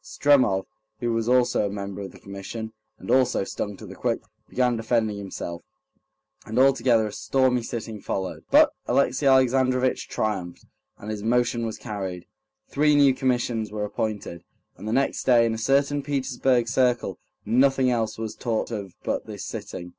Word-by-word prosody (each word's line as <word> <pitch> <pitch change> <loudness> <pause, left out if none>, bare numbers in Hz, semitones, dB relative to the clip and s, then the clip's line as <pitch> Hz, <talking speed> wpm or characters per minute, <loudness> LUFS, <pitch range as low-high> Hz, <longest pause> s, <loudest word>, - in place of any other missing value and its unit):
Stremov, 110 -3 +3 0.3
who 120 -1 -1
was 115 +1 -1
also 125 -4 +3
a - - -5
member 100 -1 -5
of 95 - -7
the - - -15
Commission, 105 +3 -7 0.2
and - - -5
also 130 -5 +3
stung 100 +1 -5
to - - -10
the - - -9
quick, - - -1 0.3
began 125 -1 +1
defending 110 -2 0
himself, 85 -3 -6 0.8
and 110 +2 -5
altogether 130 -4 +4
a 105 - -4
stormy 130 -2 +1
sitting 115 -2 -6
followed; 95 -1 -4
but - - +6 0.2
Alexey 135 +2 +2
Alexandrovitch 130 -1 +3
triumphed, 95 -5 -3 0.3
and 105 - -7
his 105 -1 -4
motion 120 +1 +1
was 110 - -5
carried, 95 -4 -5 0.4
three 150 +1 +3
new 140 -2 +6
commissions 120 -4 -1
were 105 -1 -2
appointed, 105 -5 -4 0.3
and 105 - -9
the - - -1
next 135 +3 +1
day 120 -2 +5
in 115 - 0
a 110 - -4
certain 140 +4 +2
Petersburg 130 -3 0
circle 120 -6 +1 0.3
nothing 130 +1 +3
else 115 -3 -1
was 110 -1 -4
talked 115 -1 -2
of 100 -5 -5
but - - -2
this - - -7
sitting. 90 -1 -7
115 Hz, 165 wpm, -25 LUFS, 105-130 Hz, 0.8 s, but